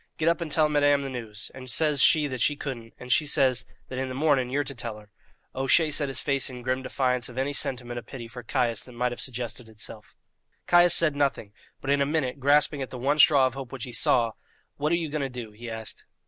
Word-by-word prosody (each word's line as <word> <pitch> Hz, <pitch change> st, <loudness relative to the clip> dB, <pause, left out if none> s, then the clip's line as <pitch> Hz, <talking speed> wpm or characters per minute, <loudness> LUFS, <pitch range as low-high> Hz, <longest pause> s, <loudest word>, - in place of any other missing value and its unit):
Get 155 Hz, -, 0 dB
up 170 Hz, +1 st, 0 dB
and 160 Hz, -3 st, -4 dB
tell 155 Hz, 0 st, +3 dB
madame 145 Hz, -1 st, +3 dB
the 135 Hz, -, -5 dB
news;' 110 Hz, -5 st, -7 dB
and 130 Hz, -1 st, -9 dB
says 150 Hz, 0 st, +2 dB
she 155 Hz, -2 st, +5 dB
that 130 Hz, -4 st, -4 dB
she 145 Hz, -, +3 dB
couldn't, 120 Hz, -6 st, -7 dB
and 125 Hz, 0 st, -8 dB
she 155 Hz, +2 st, +3 dB
says 130 Hz, -3 st, +2 dB, 0.2 s
that 130 Hz, -, -5 dB
in 130 Hz, 0 st, -2 dB
the 130 Hz, -, -5 dB
morning 135 Hz, -3 st, +2 dB
you're 145 Hz, +3 st, 0 dB
to 140 Hz, -, -5 dB
tell 115 Hz, -3 st, -5 dB
her." 105 Hz, -1 st, -16 dB, 0.4 s
O'Shea 135 Hz, +4 st, +3 dB
set 145 Hz, 0 st, 0 dB
his 135 Hz, -1 st, -3 dB
face 140 Hz, -2 st, 0 dB
in 125 Hz, -1 st, -9 dB
grim 130 Hz, +1 st, -1 dB
defiance 125 Hz, -1 st, -1 dB
of 125 Hz, -, -12 dB
any 135 Hz, +2 st, -1 dB
sentiment 120 Hz, -3 st, -2 dB
of 120 Hz, -, -15 dB
pity 120 Hz, -4 st, -8 dB
for 115 Hz, +2 st, -9 dB
Caius 115 Hz, -1 st, 0 dB
that 125 Hz, -, -13 dB
might 125 Hz, +1 st, -1 dB
have 120 Hz, -, -5 dB
suggested 120 Hz, -2 st, -5 dB
itself. 110 Hz, 0 st, -8 dB, 0.5 s
Caius 175 Hz, -1 st, +6 dB
said 155 Hz, -4 st, +3 dB
nothing; 140 Hz, -8 st, -1 dB, 0.3 s
but 135 Hz, -, -1 dB
in 140 Hz, 0 st, +3 dB
a 140 Hz, -, +2 dB
minute, 145 Hz, -3 st, -1 dB
grasping 145 Hz, +1 st, +3 dB
at 130 Hz, -, -4 dB
the 130 Hz, -, -7 dB
one 140 Hz, +5 st, 0 dB
straw 145 Hz, -4 st, +7 dB
of 130 Hz, -, -1 dB
hope 135 Hz, -3 st, -7 dB
which 135 Hz, -3 st, -7 dB
he 125 Hz, -, -6 dB
saw, 115 Hz, 0 st, +3 dB, 0.5 s
"What 150 Hz, +2 st, 0 dB
are -, -, +4 dB
you 170 Hz, -2 st, -2 dB
going 150 Hz, 0 st, -2 dB
to 135 Hz, -, -2 dB
do?" 120 Hz, -3 st, -7 dB
he 115 Hz, +3 st, -9 dB
asked. 110 Hz, -1 st, -7 dB
130 Hz, 250 wpm, -26 LUFS, 120-145 Hz, 0.5 s, straw